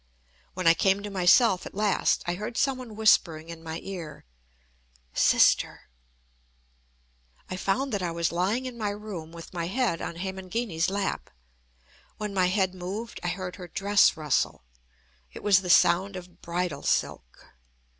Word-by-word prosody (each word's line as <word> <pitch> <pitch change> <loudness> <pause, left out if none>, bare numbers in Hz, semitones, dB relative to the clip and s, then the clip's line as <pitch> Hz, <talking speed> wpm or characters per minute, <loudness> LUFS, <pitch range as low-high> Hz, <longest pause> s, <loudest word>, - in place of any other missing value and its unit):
When 185 -1 -4
I 165 - +8
came 195 +3 +1
to 205 - -5
myself 190 +2 +4
at - - -13
last, 210 -1 +1
I 175 - -1
heard 210 +5 -5
some 270 -2 +1
one 235 -4 -9
whispering 170 -7 +3
in 165 -1 -8
my 165 0 -6
ear: 170 - -7 0.9
"Sister." - - +3 1.6
I - - -2
found 230 +9 -1
that 200 - -1
I 175 - -1
was 170 0 -1
lying 195 +9 0
in 245 -2 -7
my 210 -2 -1
room 205 -6 -7
with 170 +1 -11
my 170 -1 -3
head 205 -3 0
on - - -5
Hemangini's 190 0 -2
lap. 200 0 -2 0.9
When 210 -1 -4
my 185 -2 +3
head 190 0 +1
moved, 195 +6 -6
I - - -3
heard 180 +1 -4
her 180 -2 -8
dress 200 +3 +3
rustle. 150 - 0 0.7
It - - -10
was 195 -3 +5
the 180 - -6
sound 190 +3 +4
of 180 -1 -10
bridal 175 -1 -3
silk. 60 0 -2
185 Hz, 155 wpm, -27 LUFS, 170-205 Hz, 1.6 s, I